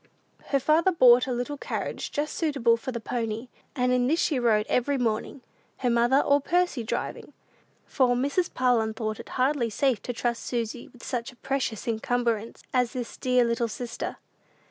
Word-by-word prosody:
Her 275 - +1
father 320 +7 +3
bought 250 -6 +6
a - - -2
little 245 +4 -3
carriage - - -4
just 295 +1 -2
suitable 275 -8 +2
for 230 +3 -5
the 235 - -4
pony, 225 +1 -3 0.3
and 250 -2 +1
in 250 0 +2
this 320 +5 +2
she 295 -7 +1
rode 220 -3 +3
every 275 +3 +1
morning, 235 +2 -2 0.3
her 250 -2 0
mother 240 +4 +4
or 285 0 +3
Percy 350 -5 +1
driving; 220 - -4 0.5
for 250 -3 +2
Mrs. 285 +8 0
Parlin 235 -4 +1
thought 215 -1 -3
it - - -9
hardly 255 -2 +1
safe 250 0 +1
to - - -4
trust 235 0 -2
Susy 235 0 -3
with 245 - -17
such 245 -2 -3
a - - -19
precious 265 -4 -3
encumbrance 230 -1 -1
as 250 -1 +1
this 245 -3 -5
dear 250 -1 +2
little 235 0 0
sister. 230 +2 -5
245 Hz, 175 wpm, -26 LUFS, 235-270 Hz, 0.5 s, bought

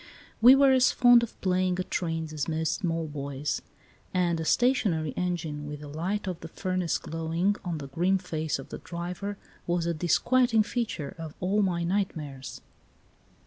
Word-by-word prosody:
We 250 +4 +9
were 275 0 +6
as 255 -1 +5
fond 245 -1 +6
of 235 - -6
playing 185 -1 +1
at 185 - -4
trains 165 -2 -2
as 150 -3 -2
most 160 0 0
small 165 -4 -2
boys, 140 -1 -3 0.5
and 175 -2 +2
a 160 - -3
stationary 195 - +2
engine 165 -4 -3
with 150 0 -7
the 150 - -8
light 175 +8 -2
of 180 -3 -4
the 165 - -8
furnace 185 0 -1
glowing 165 +5 -1
on 175 -4 -3
the 140 -2 -7
grim 175 +8 +1
face 160 -4 -2
of 135 - -10
the - - -7
driver 180 +4 -5 0.3
was 175 -1 0
a 170 - 0
disquieting 225 - +3
feature 220 - -3
of 160 -2 -7
all 195 +3 +1
my 175 -3 0
nightmares. 160 -8 -3
175 Hz, 170 wpm, -28 LUFS, 160-195 Hz, 0.5 s, We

